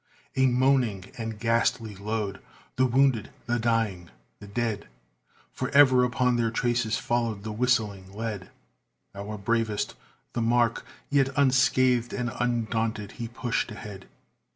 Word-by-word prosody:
A 130 0 +4
moaning 125 -6 +2
and 110 -2 -5
ghastly 115 0 +1
load 105 0 -3 0.4
the 130 0 +3
wounded 130 -3 +2 0.2
the 120 0 0
dying 110 -7 0 0.3
the 100 - -11
dead! 110 0 -2 0.7
For - - -3
ever 130 -3 +7
upon 125 0 +2
their 115 -1 +1
traces 120 0 0
followed 115 -4 -1
the 110 - -4
whistling 105 -5 0
lead, 105 -3 -5 0.6
Our 100 +2 -6
bravest 110 +1 -1 0.4
the 120 - -1
mark, 115 0 +2 0.2
yet 140 -2 +3
unscathed 130 -3 +3
and 120 -2 -2
undaunted, 115 -3 -1
he 120 -2 -6
pushed 120 +1 -2
ahead. 105 -2 -9
115 Hz, 130 wpm, -27 LUFS, 105-125 Hz, 0.7 s, ever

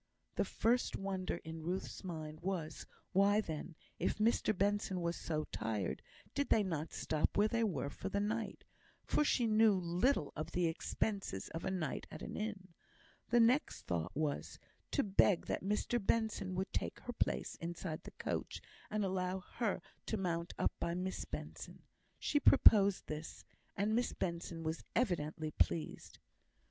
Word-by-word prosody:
The - - +1
first 240 +2 +1
wonder 190 -1 -2
in 160 0 -6
Ruth's 180 +5 -3
mind 155 -4 -5
was, 170 -4 -3 0.2
why 200 +2 +5
then, 165 -4 -4 0.2
if - - +1
Mr 215 -1 +2
Benson 200 -1 +1
were 170 -1 0
so 155 -3 -2
tired, 105 -5 -2 0.3
did 285 - 0
they 215 - +5
not 165 -5 -2
stop 155 -1 0
where 205 +1 +5
they 230 +1 +1
were 150 - -1
for - - -5
the 200 - 0
night; 215 0 -2 0.4
for - - +3
she 255 -4 +3
knew 220 -1 +6
little 180 - +1
of 155 - -4
the 180 -1 +2
expenses 170 - -1
of 165 - -5
a - - +1
night 175 -7 -2
at - - -8
an - - -5
inn. 210 -3 -4 0.6
The 240 - +5
next 245 +6 +3
thought 85 -1 -1
was, 150 -2 -1 0.3
to 280 - +2
beg 195 -2 +4
that - - -1
Mr 210 +3 0
Benson 210 -3 +1
would 190 +1 -2
take - - -2
her 245 - -5
place - - 0
inside 170 -1 -4
the - - -9
coach, - - -3 0.3
and 210 -1 0
allow 185 0 -1
her 200 -1 -2 0.2
to 220 - 0
mount 170 -2 -2
up - - +2
by 170 - -1
Miss 185 +1 -2
Benson. - - -7 0.3
She 290 - +1
proposed 200 -9 +7
this, 155 +1 -6 0.3
and 205 +2 +2
Miss 240 +2 +1
Benson 170 -1 -3
was 160 +1 -2
evidently 160 -8 0
pleased. 160 +1 -1
185 Hz, 160 wpm, -36 LUFS, 165-215 Hz, 0.6 s, proposed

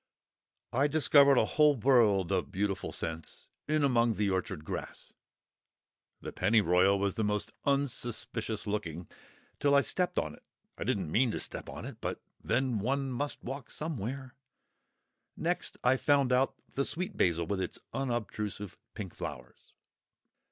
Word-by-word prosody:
I 135 +4 +3
discovered 145 -2 +5
a - - +5
whole 150 -1 +4
world 110 -7 +4
of 95 0 0
beautiful 100 -2 -1
scents 80 -1 -4 0.2
in 155 0 +2
among 120 -4 +3
the 100 0 +1
orchard 95 -4 -2
grass. - - -6 1.1
The - - -6
Pennyroyal 95 -1 +4
was 100 +1 -1
most 105 -1 0
unsuspicious 120 -5 -1
looking, 90 -6 -3 0.5
till 140 0 +4
I 140 - +7
stepped 180 +4 0
on 80 - 0
it. - - -15 0.3
(I - - -5
didn't 95 -7 -1
mean 125 +6 +3
to - - -2
step - - -6
on - - -7
it; - - -8
but - - -3 0.2
then 130 -4 +1
one 135 +5 -1
must 140 +4 -3
walk 135 0 -6
somewhere!) 130 -3 -4 1.0
Next - - -2
I 125 +1 +4
found 140 -2 +3
out 130 +2 +2 0.2
the 140 - +1
Sweet 180 +8 -2
Basil, 85 -1 +2
with 95 +2 -2
its 90 - -4 0.2
unobtrusive 105 -7 -3 0.2
pink 100 -5 -6
flowers. 60 -1 -8
115 Hz, 145 wpm, -31 LUFS, 95-135 Hz, 1.1 s, I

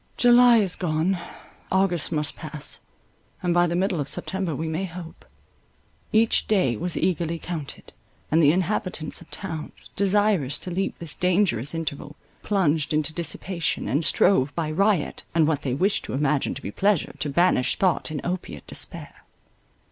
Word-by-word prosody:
July 245 -1 +7
is 195 -5 +1
gone. 175 +2 0 0.5
August 190 -4 +2
must 150 -2 0
pass, 150 -2 -3 0.6
and 175 -1 +1
by 175 0 +4
the 170 - -2
middle 185 -1 0
of 140 - -2
September 190 -5 -2
we 160 +4 -3
may 160 +4 -2
hope. 175 -2 -9 0.9
Each 225 +1 +3
day 185 - +2
was 175 +10 -2
eagerly 170 -2 0
counted; 160 -4 -7 0.4
and 160 +2 +4
the 145 -2 +6
inhabitants 185 -3 -2
of - - -15
towns, 160 -5 -5
desirous 200 -8 +2
to 180 - -7
leap 195 +3 -2
this 165 -3 -7
dangerous 180 - +1
interval, 150 -2 -4 0.3
plunged 160 -6 +1
into 155 +1 +2
dissipation, 170 +1 -2
and 145 +5 +1
strove, 145 -5 +3
by 160 -2 -2
riot, 195 +1 +1
and 165 -2 +5
what 150 -3 0
they 130 -2 -2
wished 195 +8 +1
to - - -6
imagine 145 +1 0
to - - -8
be 100 - -4
pleasure, 200 - +1
to 150 - -1
banish 155 -3 +2
thought 185 -4 +1
and 155 -2 -4
opiate 180 +1 -4
despair. - - -5
170 Hz, 160 wpm, -24 LUFS, 150-190 Hz, 0.9 s, July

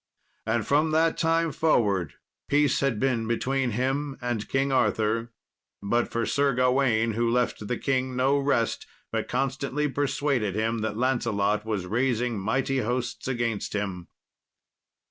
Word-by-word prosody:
And 110 -1 0
from 150 +3 +2
that 165 0 +3
time 165 0 +1
forward 100 - +1 0.3
peace 145 -1 +3
had 135 -6 0
been 120 -3 0
between 130 +2 0
him 135 +2 -1
and 120 -4 -3
King 135 +1 +1
Arthur, 115 -3 +1 0.5
but 120 +4 0
for 115 0 -1
Sir 140 -2 +1
Gawain, 125 -3 +2
who 115 +2 0
left 120 -3 0
the 125 - -1
king 130 -1 -1
no 135 +3 +2
rest, 135 -5 0 0.2
but - - -2
constantly 135 +3 -1
persuaded 140 -7 0
him 110 +1 0
that 110 -1 -3
Lancelot 110 -4 0
was 105 -5 -2
raising 120 +1 0
mighty 130 +6 0
hosts 125 +2 -2
against 120 -4 -2
him. 95 -4 -3
125 Hz, 140 wpm, -26 LUFS, 110-135 Hz, 0.5 s, that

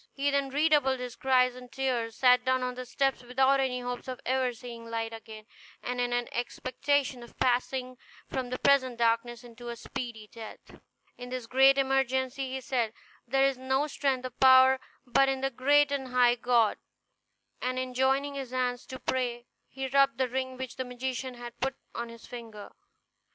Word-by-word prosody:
He 285 +1 +1
then 280 -1 +1
redoubled 290 -2 +2
his 250 -1 -6
cries 255 -1 +3
and 250 0 -12
tears, 250 -4 -1
sat 250 -1 +5
down 260 0 +1
on 250 0 -2
the 250 0 -7
steps 270 +1 0
without 265 +2 +2
any 255 -2 0
hopes 245 +1 -5
of 255 -1 -5
ever 260 0 +1
seeing 235 -1 -10
light 225 0 -3
again, 220 -1 -10 0.4
and 250 0 -2
in 245 0 0
an 245 0 0
expectation 255 +2 -1
of 235 - -14
passing 255 0 0 0.3
from 255 -2 -3
the 255 - -3
present 260 -3 +3
darkness 235 +1 0
to 240 +1 -8
a 235 - -4
speedy 235 -1 -6
death. 225 -2 -11 0.4
In 245 0 -7
this 255 -2 -4
great 270 +3 +5
emergency 265 0 0
he 265 0 -4
said, 235 -3 -1 0.3
"There 270 +2 +3
is 270 -2 0
no 265 +2 +1
strength 275 -3 -1
or 255 - -4
power 260 +1 +6 0.3
but 270 +2 +3
in 265 -1 -1
the 270 0 0
great 285 +3 +3
and 275 -2 -2
high 250 -1 +4
God"; 240 -2 +2 0.8
and 255 0 -1
in 255 0 -3
joining 270 +2 +1
his 270 -3 -5
hands 250 -1 -2
to 260 - -7
pray 245 -2 -2 0.2
he 265 0 -5
rubbed 275 -1 +3
the 260 -1 +1
ring 260 +1 -3
which 260 -1 -6
the 260 - -1
magician 255 0 -4
had 240 -1 -10
put 265 +1 -1 0.2
on 235 0 -4
his 230 0 -12
finger. 225 -4 -9
255 Hz, 185 wpm, -29 LUFS, 245-265 Hz, 0.8 s, power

